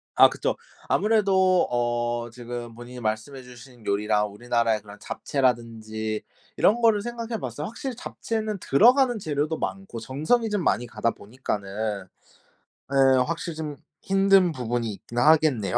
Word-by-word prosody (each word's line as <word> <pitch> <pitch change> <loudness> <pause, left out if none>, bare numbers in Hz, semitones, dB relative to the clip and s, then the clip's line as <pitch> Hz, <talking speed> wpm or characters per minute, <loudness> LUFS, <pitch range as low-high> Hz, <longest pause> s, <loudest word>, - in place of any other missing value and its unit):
아 - - +8
그쵸. - - -2 0.3
아무래도 195 -4 +3
어 120 -1 -1
지금 120 -1 -7
본인이 120 +1 -9
말씀해 110 +4 -3
주신 125 -1 -14
요리랑 105 +1 +1
우리나라의 115 0 0
그런 105 0 -13
잡채라든지 110 -4 -2 0.3
이런 235 +4 +3
거를 225 -3 +4
생각해 230 0 -4
봤어요. 130 +4 -5
확실히 245 +3 -5
잡채는 220 -3 -4
들어가는 245 - +4
재료도 155 -3 -1
많고 195 -12 -5
정성이 155 - 0
좀 205 -4 0
많이 120 - +1
가다 115 0 -1
보니까는 105 -3 -4 0.8
예 135 -1 +5
확실히 165 +1 -4
좀 150 -2 -5 0.2
힘든 195 -2 +4
부분이 120 -4 -2
있긴 120 +4 -11
하겠네요. 130 - +4
125 Hz, 325 characters per minute, -25 LUFS, 115-190 Hz, 0.8 s, 아